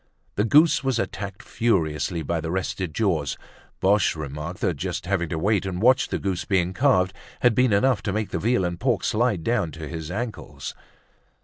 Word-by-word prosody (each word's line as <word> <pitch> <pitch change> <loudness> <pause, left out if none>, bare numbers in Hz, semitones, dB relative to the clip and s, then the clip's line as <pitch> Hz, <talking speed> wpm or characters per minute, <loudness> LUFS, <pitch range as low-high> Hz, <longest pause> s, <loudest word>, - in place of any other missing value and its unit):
The 105 - +1
goose 150 +6 +5
was 135 -3 +1
attacked 100 -3 -4
furiously 80 - 0
by 80 +3 -1
the 80 - -4
rested 95 -1 -2
jaws. 80 -7 0 0.4
Boche 100 -1 +3
remarked 75 +3 -6
that 85 - 0
just - - -3
having 85 -3 0
to 80 - -2
wait 100 +4 +1
and 95 -2 -3
watch 125 +5 +4
the - - -2
goose 95 -2 -2
being 95 -2 +1
carved 95 -7 +3 0.3
had 120 -1 +5
been 125 +1 +3
enough 100 +2 +3
to 100 - -2
make 105 +1 -2
the 85 - -1
veal 115 -1 +1
and 85 -1 -3
pork 120 -5 +1
slide 110 -7 +1
down 115 -7 +1
to 80 -2 -7
his 80 0 -6
ankles. 110 +4 -5
95 Hz, 190 wpm, -24 LUFS, 85-115 Hz, 0.4 s, goose